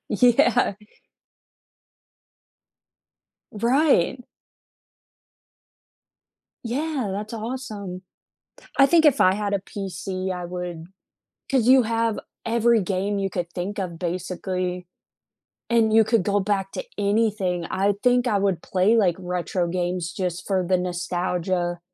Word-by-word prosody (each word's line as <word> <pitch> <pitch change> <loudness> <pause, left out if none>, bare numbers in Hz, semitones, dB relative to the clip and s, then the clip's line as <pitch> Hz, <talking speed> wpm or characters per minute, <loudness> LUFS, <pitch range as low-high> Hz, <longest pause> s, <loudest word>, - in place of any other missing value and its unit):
Yeah. 245 -3 +3 2.8
Right. 250 - +2 2.4
Yeah, 270 0 -2
that's 210 +3 -5
awesome. 215 -6 -6 0.8
I 275 - +8
think 325 +2 +4
if 280 -2 +5
I 185 +1 +5
had 205 -1 -2
a - - +2
PC, 190 -1 -5
I 180 -1 -5
would 175 -2 -6 0.7
'cause 250 -3 +2
you 260 0 +7
have 230 -1 0 0.3
every 230 -1 +3
game 195 +2 -1
you 195 -1 -1
could 175 -1 -4
think 190 +3 -4
of 170 -3 -4
basically, 180 0 -3 0.8
and 225 -2 +3
you 225 - +7
could 220 -3 +2
go 205 0 +1
back 195 -1 -1
to - - -4
anything. 200 -4 0
I 200 +2 +1
think 245 0 +3
I 210 -4 +2
would 195 -4 0
play, 195 +5 +2
like, 180 -6 +3
retro 180 -1 -2
games 175 0 -2
just 180 -2 -3
for 190 -3 +1
the 185 0 +3
nostalgia 175 0 -2
195 Hz, 120 wpm, -24 LUFS, 180-230 Hz, 2.8 s, I